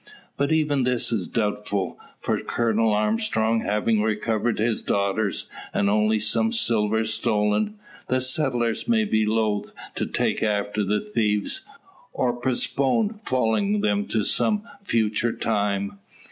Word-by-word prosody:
But 140 +1 0
even 150 -3 +2
this 125 -2 +1
is 100 -6 -1
doubtful. 105 -3 -2 0.2
For - - 0
Colonel 115 -1 +1
Armstrong 110 +1 +1
having 105 +1 +1
recovered 110 +1 0
his 110 +1 0
daughters, 100 +1 0 0.3
and 100 0 +2
only 105 +1 +3
some 110 - +1
silver 110 - +2
stolen, 110 - 0 0.3
the 130 - +1
settlers 125 - +1
may 225 -2 +3
be 110 - +1
loath 110 -2 0 0.2
to - - -2
take - - 0
after 105 0 0
the 105 +2 0
thieves, 105 - 0 0.5
or 125 -1 0
postpone 135 - 0
following 130 - +1
them 205 0 0
to 110 -2 0
some 210 - +1 0.2
future 115 - +1
time. 100 -2 -1
110 Hz, 130 wpm, -24 LUFS, 105-130 Hz, 0.5 s, only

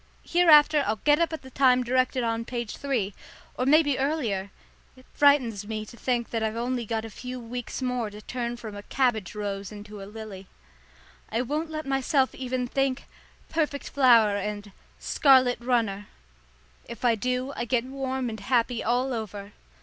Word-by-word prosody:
Hereafter 305 -4 +6
I'll 215 - +1
get 295 +8 +3
up 335 -1 +1
at 320 - -6
the 260 - -12
time 255 -1 +4
directed 255 +1 +1
on 230 0 -1
page 235 -2 -5
three, 240 -8 -1 0.4
or 255 - -1
maybe 290 -2 +4
earlier. 245 -10 -1 0.5
It 255 0 -18
frightens 250 -8 +3
me 215 -1 -4
to 225 - -13
think 240 -1 -1
that 225 - -1
I've 220 0 -1
got - - -3
only 245 -2 -2
a 225 -1 -2
few 250 +4 -7
weeks 245 +2 -6
more 250 -3 -1
to 210 0 -11
turn 240 +2 -4
from 220 -3 -8
a 205 - -7
cabbage 220 -4 0
rose 200 -2 -4
into 210 0 -9
a - - -7
lily. 210 -3 -9 0.8
I 230 +3 0
won't 305 +5 -2
let 310 0 -5
myself 270 0 +1
even 255 -1 -3
think 270 +1 -1 0.4
"perfect 300 -3 -2
flower" 230 -7 +5
and 205 0 -5 0.3
"scarlet 260 -3 +4
runner." 225 -5 0 0.8
If 235 +1 -6
I 240 - +5
do, 250 +4 -2
I 240 - -3
get 240 0 +1
warm 265 -1 -3
and 220 -2 -5
happy 235 +3 0
all 250 +3 +1
over. 205 -3 -6
245 Hz, 175 wpm, -26 LUFS, 220-265 Hz, 0.8 s, Hereafter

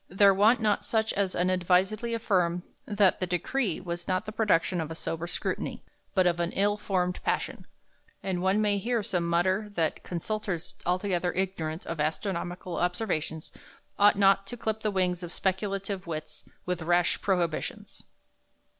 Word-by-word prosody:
There 195 +1 +6
want 215 +5 +5
not 210 -2 +1
such 220 -1 0
as 195 -2 0
unadvisedly 185 +5 +2
affirm, 180 -6 +1 0.2
that 205 -2 +3
the 185 - -1
Decree 180 +3 0
was 175 -1 -5
not 185 -1 0
the 215 - -5
production 190 -5 +2
of 160 - -4
a 160 - -5
sober 165 +1 -3
Scrutiny, - - -3 0.3
but 185 -2 +4
of 175 -1 +2
an 170 0 0
ill 205 +1 +2
formed 180 -3 -1
passion; - - -2 0.6
and 185 -2 -1
one 190 +3 +3
may 205 -1 +2
hear 230 +2 0
some 175 -3 0
mutter 185 +5 +1
that 160 -2 0
Consultors 185 0 -3
altogether 180 -1 +1
ignorant 175 -3 -2
of 165 -1 -4
Astronomical 175 +2 -2
observations 175 -4 -1 0.5
ought 205 0 +6
not 195 0 +4
to 245 - -5
clipp 220 -1 -2
the 215 - +1
wings 185 -2 0
of 175 -1 -6
speculative 195 0 -2
wits 155 -2 -5 0.2
with 180 -1 -2
rash 175 +1 +2
prohibitions." 175 -5 -2
185 Hz, 155 wpm, -28 LUFS, 175-205 Hz, 0.6 s, There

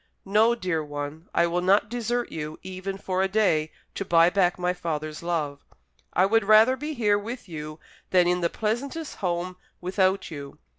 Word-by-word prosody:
"No, 215 +4 +4
dear 180 -8 -1
one; 145 +2 -6
I - - +3
will 175 +1 0
not 195 +3 +3
desert 240 +1 -2
you, 155 -1 -5
even 190 +1 -5
for 190 -1 -1
a 190 - +2
day, 190 -7 +2 0.2
to - - -3
buy 170 -1 +5
back 180 -2 +2
my 180 0 0
father's 155 -3 -4
love. 155 -5 -2 0.5
I 185 - +3
would 225 +3 +3
rather 215 +5 +6
be 300 +3 -5
here 210 -4 +2
with 230 +2 -7
you 155 -2 -7 0.3
than 180 -2 +4
in 180 0 +1
the 170 - +2
pleasantest 265 - -3
home 180 0 -2 0.2
without 190 +1 0
you. 140 -2 -8
185 Hz, 180 wpm, -26 LUFS, 165-210 Hz, 0.5 s, rather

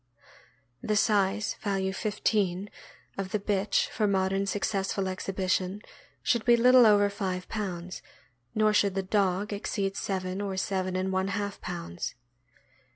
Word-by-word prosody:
The 215 - 0
size 210 0 +2
(value 195 -2 -1
15) 205 -2 0 0.5
of 195 -1 -2
the 210 - 0
bitch 200 0 +1
for 215 -3 0
modern 195 0 +1
successful 195 -1 -1
exhibition 190 +1 -2 0.4
should 235 -2 +2
be 240 -1 +5
little 250 0 +7
over 205 -1 +5
five 190 -2 -3
pounds, 185 -4 -4 0.5
nor 215 0 +3
should 200 -2 +2
the 195 - 0
dog 195 +1 0
exceed 200 -1 -2
seven 190 -1 -3
or 195 -2 -3
seven 185 -1 -1
and 185 +1 -1
one 190 0 +1
half 200 0 -3
pounds. 170 - -5
195 Hz, 135 wpm, -28 LUFS, 190-210 Hz, 0.5 s, little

